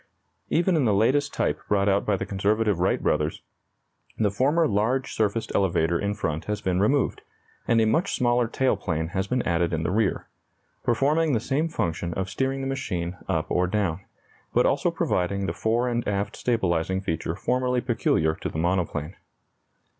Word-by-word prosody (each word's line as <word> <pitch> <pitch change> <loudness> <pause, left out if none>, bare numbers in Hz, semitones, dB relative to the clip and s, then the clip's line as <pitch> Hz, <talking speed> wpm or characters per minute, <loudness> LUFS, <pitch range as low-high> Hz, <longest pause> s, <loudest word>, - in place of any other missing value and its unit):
Even 175 +2 +2
in 150 -5 +2
the 105 -3 +3
latest 140 +8 +2
type - - -1
brought 100 -1 +2
out 100 0 +2
by 105 -2 +2
the - - -3
conservative 105 0 +1
Wright 90 - +1
brothers, 75 +1 0 0.7
the 105 -3 +2
former 145 +10 +2
large 115 +6 0
surfaced 110 +1 -1
elevator 85 -3 +2
in 100 0 -1
front 80 -5 -3
has 105 0 -2
been 90 -1 0
removed, 130 +8 +1 0.5
and 115 - +4
a 110 - +4
much 165 - +1
smaller 120 -1 +2
tail 130 +3 +1
plane 80 -2 -2
has 95 +2 -2
been 125 +2 0
added 85 0 +1
in 80 0 -1
the - - -1
rear, 105 0 0 0.6
performing 145 +6 +2
the 115 - +2
same 145 +8 -1
function 85 - -2
of 95 0 -3
steering 135 +5 -1
the 135 - -3
machine 95 -10 -3
up - - 0
or 90 0 +2
down, 95 -3 -1 0.5
but - - +4
also - - +2
providing 95 +2 -1
the - - -2
fore 115 +3 0
and 120 -1 -1
aft 100 0 -1
stabilizing 95 -6 0
feature 80 -3 -3
formerly 125 +4 0
peculiar 110 -10 +1
to - - -5
the - - -6
monoplane. 85 -1 -1
105 Hz, 175 wpm, -25 LUFS, 90-125 Hz, 0.7 s, and